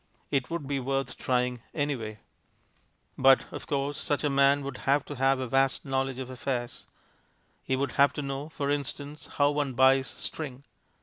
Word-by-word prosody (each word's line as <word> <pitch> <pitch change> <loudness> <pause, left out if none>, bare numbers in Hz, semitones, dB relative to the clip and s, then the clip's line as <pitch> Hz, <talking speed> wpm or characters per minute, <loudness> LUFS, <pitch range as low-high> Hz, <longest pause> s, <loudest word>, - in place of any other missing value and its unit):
It 135 -3 0
would 170 -3 -3
be 140 0 -1
worth 135 +1 -2
trying 125 -1 0
anyway. 125 -8 -2 1.0
But, 135 0 +6
of - - -7
course, 140 0 -1
such 145 0 0
a 145 - +1
man 140 +1 +4
would 135 -2 -5
have 140 +1 +3
to 145 - -6
have 135 +1 +3
a 130 - -2
vast 135 +3 +1
knowledge 135 -1 -1
of 130 -1 -5
affairs. 125 -1 -4 0.7
He 130 - 0
would 140 +2 -1
have 140 0 +4
to 145 - -4
know, 140 +2 -4
for 145 -3 -2
instance, 145 +1 -4
how 145 0 +4
one 145 -2 -1
buys 130 +1 +5
string. 140 -4 -5
135 Hz, 175 wpm, -28 LUFS, 130-145 Hz, 1.0 s, But